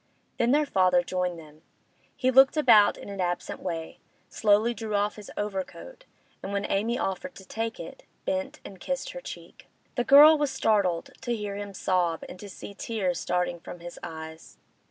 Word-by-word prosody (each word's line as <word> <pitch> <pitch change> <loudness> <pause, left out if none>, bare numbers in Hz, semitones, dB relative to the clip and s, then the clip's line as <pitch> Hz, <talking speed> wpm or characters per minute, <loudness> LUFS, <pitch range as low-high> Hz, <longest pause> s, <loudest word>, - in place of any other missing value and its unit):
Then 235 - +3
their 295 +3 +4
father 185 -7 +3
joined 180 -1 -2
them. 155 -1 -14 0.5
He 255 0 +1
looked 270 +4 +6
about 230 -8 +6
in - - -10
an 200 -1 -5
absent 175 0 -3
way, 165 -1 -5 0.3
slowly 215 +2 +3
drew 220 -2 -4
off 205 +1 0
his 210 -2 -11
overcoat, 210 - -5 0.4
and 195 - -6
when 200 0 -1
Amy 225 +5 +1
offered 260 +9 -3
to 190 - -12
take 225 +3 -4
it, - - -9 0.2
bent 280 +1 -2
and 190 - -10
kissed 270 +7 -3
her - - -8
cheek. - - -11 0.3
The 245 - 0
girl 295 +5 +8
was 295 -1 +1
startled 200 -9 +1
to 240 -1 -1
hear 205 -2 -4
him 200 -1 -6
sob 175 -4 0
and 180 - -10
to 205 - -9
see 200 - -9
tears 195 -4 -2
starting 180 -1 -1
from 175 - -10
his 175 0 -9
eyes. 160 0 -9
205 Hz, 180 wpm, -27 LUFS, 180-245 Hz, 0.5 s, girl